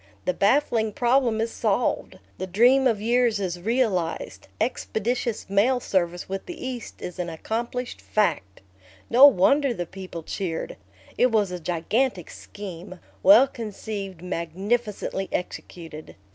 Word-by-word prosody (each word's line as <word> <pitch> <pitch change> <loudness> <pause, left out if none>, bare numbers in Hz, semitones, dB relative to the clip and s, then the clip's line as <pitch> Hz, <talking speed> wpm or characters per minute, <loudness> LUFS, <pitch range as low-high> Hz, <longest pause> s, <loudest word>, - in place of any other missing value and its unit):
The 180 - +1
baffling 220 +1 +2
problem 240 -1 +2
is 225 +1 -1
solved; - - -1 0.2
the 185 - -3
dream 245 +8 +5
of 225 -4 +1
years 235 0 +2
is 180 -3 -3
realized; 205 -6 -1
expeditious 235 0 -2
mail 210 +7 +3
service 175 -5 -1
with 195 0 -5
the 350 - -7
East 250 -3 -6
is 180 +1 -6
an 175 -1 -2
accomplished 235 +9 -4
fact. 95 - -1 0.5
No 255 +4 +10
wonder 275 +4 +3
the 175 - -3
people 185 -2 -8
cheered! 170 -1 -4 0.4
It 250 0 +4
was 210 -4 +2
a 180 - -4
gigantic 180 +5 -1
scheme, 185 -2 -9 0.2
well 285 -2 +8
conceived, 205 -6 -6
magnificently 190 +4 -2
executed. 165 -3 -6
210 Hz, 130 wpm, -25 LUFS, 180-240 Hz, 0.5 s, No